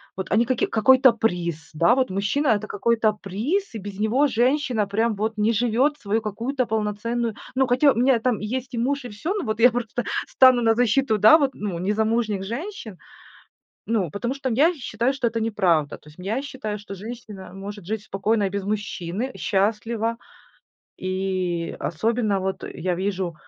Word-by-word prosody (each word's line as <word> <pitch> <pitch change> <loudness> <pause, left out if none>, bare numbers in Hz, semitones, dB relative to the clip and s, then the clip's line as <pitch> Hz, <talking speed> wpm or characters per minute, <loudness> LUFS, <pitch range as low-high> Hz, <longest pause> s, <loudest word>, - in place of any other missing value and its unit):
вот 190 -1 -5
они 230 +4 +4
каки 255 0 +1
Какой-то 260 +4 +5
приз, 175 -8 -2
да, 170 +10 +4
вот 260 -3 +1
мужчина- 205 +10 0
это 215 -3 +2
какой-то 220 +1 +1
приз, 225 - -3
и - - -2
без 200 -1 -8
него 235 +7 +2
женщина 250 -3 +1
прям 220 +3 +1
вот 215 +2 -2
не 215 +2 +2
живёт 245 +6 +1
свою 215 -1 -1
какую-то 245 +5 -2
полноценную 220 +1 -2 0.2
Ну 260 0 +2
хотя 260 +3 +4
у - - -3
меня 250 +1 +4
там 240 -2 0
есть 250 +4 -4
и 230 - -2
муж, 275 +2 -1
и - - -6
всё, 315 - -3
но 405 - -2
вот 215 -3 -3
я 245 +2 +7
просто 240 0 -3 0.2
стану 255 -2 +5
на 225 0 +4
защиту, 235 -1 +2
да, 220 +8 +8
вот, 280 -4 +1
ну 200 -7 -4
незамужних 215 +2 0
женщин, 235 - -6 0.9
ну, 215 -7 0
потому 235 - -3
что 275 -1 -3
я 295 +9 +3
считаю, 245 -2 -1
что 265 -3 0
это 230 0 -2
неправда. 180 -9 +1
То 150 - -17
есть, 150 - -18
м, 180 - -9
я 225 +7 -1
считаю, 235 -7 -5
что 200 -1 -9
женщина 210 -3 -9
может 200 -1 -8
жить 215 +1 -3
спокойно 210 +2 0
и - - 0
без 200 0 -3
мужчины, 205 +2 -3
счастливо. 225 +3 0 0.8
И 185 -2 -2
особенно 215 +3 0
вот 190 0 -3
я 180 +1 -1
вижу: 185 -2 -2
220 Hz, 180 wpm, -23 LUFS, 200-245 Hz, 0.9 s, да